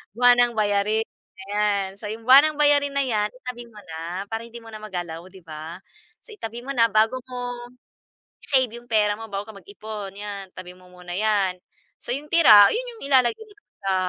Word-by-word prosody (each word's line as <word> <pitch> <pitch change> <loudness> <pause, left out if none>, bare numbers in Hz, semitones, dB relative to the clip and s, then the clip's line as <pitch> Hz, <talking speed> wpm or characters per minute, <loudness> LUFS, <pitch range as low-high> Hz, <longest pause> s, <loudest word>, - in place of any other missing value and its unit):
Buwanang 245 0 +5
bayarin 210 +1 +1 0.3
na 190 - -11
yan. 205 -2 +1
So - - -9
'yong 220 +2 -6
buwanang 280 +4 +7
bayarin 290 -1 +3
na 280 - +2
yan 215 -5 0
itabi 250 -1 -8
mo 215 -2 -15
na, 170 +2 -6
para 225 0 -4
hindi 235 0 -11
mo 225 - -12
na 215 - -7
magalaw, 175 -5 -6
'di 190 0 -15
ba? 160 +2 -8 0.5
So, 460 - -15
itabi 235 - -7
mo 275 - -4
na, 230 -1 +5
bago 220 +4 +2
mo 245 -1 -4 0.9
i-save 260 -4 +2
yung 240 - -16
pera 210 -2 +3
mo, 225 - -8
bago 200 +2 -5
ka - - -12
mag-ipon 200 +1 -8
yan 200 -2 -7
tabi 180 -1 -10
mo 180 0 -19
muna 180 -1 -10
yan. 200 -3 +1 0.5
S - - -7
o - - +1
yung 295 +2 -9
tira 215 -12 +8
'yon - - -2
yung - - -15
ilalagay 255 - +3
mo 415 - -19 0.3
sa, 195 -1 0
215 Hz, 200 wpm, -23 LUFS, 195-245 Hz, 0.9 s, tira